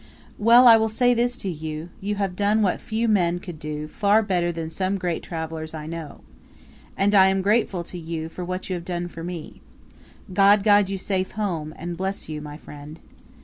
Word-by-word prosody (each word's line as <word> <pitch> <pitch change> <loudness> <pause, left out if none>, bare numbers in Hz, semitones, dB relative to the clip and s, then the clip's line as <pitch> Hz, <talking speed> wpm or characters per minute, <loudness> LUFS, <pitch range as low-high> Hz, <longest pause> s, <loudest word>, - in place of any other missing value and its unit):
"Well, 235 +4 +7
I 230 -1 +9
will 220 0 +1
say 245 +3 +3
this 240 +1 0
to - - -6
you: 155 +1 -6
you 205 0 -2
have 195 -3 -2
done 210 +2 +2
what 185 - 0
few 225 +2 -1
men 175 -5 +2
could 175 -4 -9
do 150 -1 -5
far 205 +6 +2
better 175 -4 0
than 165 -1 -5
some 190 +3 -1
great 180 -3 -2
travellers 160 -1 -5
I 155 -1 -6
know. 160 -2 -7 0.8
And 200 +1 +2
I 190 -2 +7
am 190 0 +1
grateful 200 -3 +1
to 175 +1 -8
you 160 -1 -5
for 180 +2 -7
what 185 +1 -4
you 185 - -3
have 175 -1 -4
done 175 -1 -3
for 165 -1 -9
me. 175 -2 -7 0.7
God 200 +1 +5
guide 205 -2 +4
you 195 - -2
safe 190 0 -2
home, 170 -7 -3
and 175 +1 -5
bless 190 +2 -3
you, 155 -1 -5
my 150 0 -8
friend." 150 +1 -11
185 Hz, 205 wpm, -24 LUFS, 165-205 Hz, 0.8 s, I